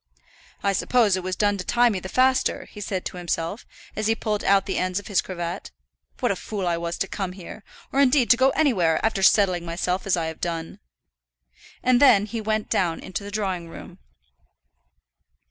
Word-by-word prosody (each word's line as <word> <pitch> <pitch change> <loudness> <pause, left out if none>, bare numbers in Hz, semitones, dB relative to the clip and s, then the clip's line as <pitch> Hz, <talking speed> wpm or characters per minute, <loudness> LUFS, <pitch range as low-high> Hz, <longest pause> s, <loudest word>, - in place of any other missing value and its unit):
"I 200 - +2
suppose 215 0 +2
it 185 - -3
was 185 0 -3
done 205 0 +1
to - - -3
tie 240 +4 +3
me 200 -4 -2
the 190 - -8
faster," 260 +3 +2
he 210 - -9
said 190 -2 -3
to - - -5
himself, 175 +3 -3 0.3
as 215 0 -1
he 225 - +2
pulled 215 -2 -2
out 195 0 +3
the 195 - -2
ends 185 0 -1
of 205 - -4
his 200 -4 +1
cravat. 175 0 -5 0.5
"What 245 - +2
a - - 0
fool 200 0 -5
I 175 -1 +1
was 170 0 -4
to 195 - -1
come 190 -2 -4
here, 190 +2 -10 0.3
or 275 - +1
indeed 270 -2 +4
to - - +8
go 260 +2 +4
anywhere, 190 - +2
after 220 -3 0
settling 190 -3 +4
myself 180 +3 -2
as 185 - +2
I 165 - -1
have 160 0 -6
done." 165 -1 -4 1.0
And 250 -1 +3
then 235 -8 +6
he 225 +1 -5
went 215 0 -1
down 170 -3 0
into 185 +2 -6
the 200 - -7
drawing 190 -5 -3
room. 180 +2 -11
195 Hz, 200 wpm, -24 LUFS, 180-220 Hz, 1.0 s, to